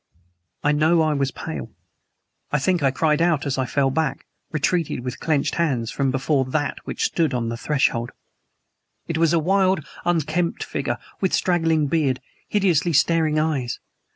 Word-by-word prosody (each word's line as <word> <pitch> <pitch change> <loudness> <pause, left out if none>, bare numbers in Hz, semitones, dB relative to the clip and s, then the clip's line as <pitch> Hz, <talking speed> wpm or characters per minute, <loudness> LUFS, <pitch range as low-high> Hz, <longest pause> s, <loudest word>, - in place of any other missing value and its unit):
I 145 - +3
know 160 +3 +3
I 155 -1 +2
was 140 -2 0
very 80 - -6
pale. 65 - -8 0.8
I 150 - +2
think 175 +4 +1
I 135 - +4
cried 150 +3 +1
out 170 -4 +2
as 135 -1 -1
I 130 - 0
fell 135 0 +1
back 150 -2 -1 0.3
retreated 160 -2 0
with 125 0 -5
clenched 150 -4 0
hands 125 -9 0
from 140 -1 0
before 135 +1 +1
THAT 145 +3 -2
which - - -3
stood 160 -6 +1
on 115 -2 -1
the 115 - -3
threshold. 120 -3 0 1.0
It 165 -1 -2
was 165 -2 +4
a 170 - +3
wild, 190 0 +2 0.2
unkempt 170 0 0
figure, 125 -4 -3 0.2
with 190 - 0
straggling 165 -4 +2
beard, 140 -4 +1 0.3
hideously 175 -5 +2
staring 155 +1 +3
eyes. 150 -6 -1
150 Hz, 165 wpm, -23 LUFS, 135-165 Hz, 1.0 s, I